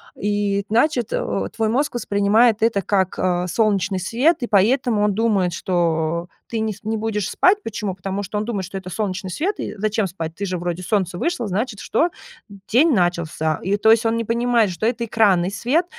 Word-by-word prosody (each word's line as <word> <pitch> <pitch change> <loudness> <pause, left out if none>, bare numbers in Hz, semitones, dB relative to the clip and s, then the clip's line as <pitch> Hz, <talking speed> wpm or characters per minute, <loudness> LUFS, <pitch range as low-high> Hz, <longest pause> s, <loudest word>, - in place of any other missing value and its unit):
И, 205 -1 -1
значит, 240 +1 +1
э, 100 -1 -2
твой 220 -1 0
мозг 265 +4 0
воспринимает 215 +1 +2
это 225 -3 +2
как, 190 0 0
а, 180 -1 0
солнечный 195 -1 +1
свет, 250 - +2
и 240 - -2
поэтому 220 +2 +2
он 210 -1 +2
думает, 200 -5 +1
что 170 -2 -1 0.2
ты 230 - -2
не 220 -1 -1
с 200 - -18
не 220 +1 -2
будешь 210 -2 -2
спать. 400 +3 +3
Почему? 210 - -4
Потому 195 +2 -4
что 205 +2 -4
он 210 - -1
думает, 205 -5 -3
что 195 +2 -7
это 190 -1 -7
солнечный 185 -1 -3
свет. 345 - -1
И - - -4
зачем 210 0 0
спать? 165 -3 -6
Ты 200 - -4
же 185 -2 -2
вроде, 175 0 -3
солнце 185 -2 -1
вышло, 330 - -1
значит 205 +3 -2
что? 340 - +1 0.6
День 285 +7 +5
начался. 170 -5 0
И 195 +3 +1
то 220 +2 +4
есть 225 0 +4
он 225 0 +2
не 230 - -1
понимает, 235 -1 +2
что 175 +4 -3
это 235 0 0
экранный 195 -5 +2
свет, 255 - +1
205 Hz, 200 wpm, -21 LUFS, 185-230 Hz, 0.6 s, День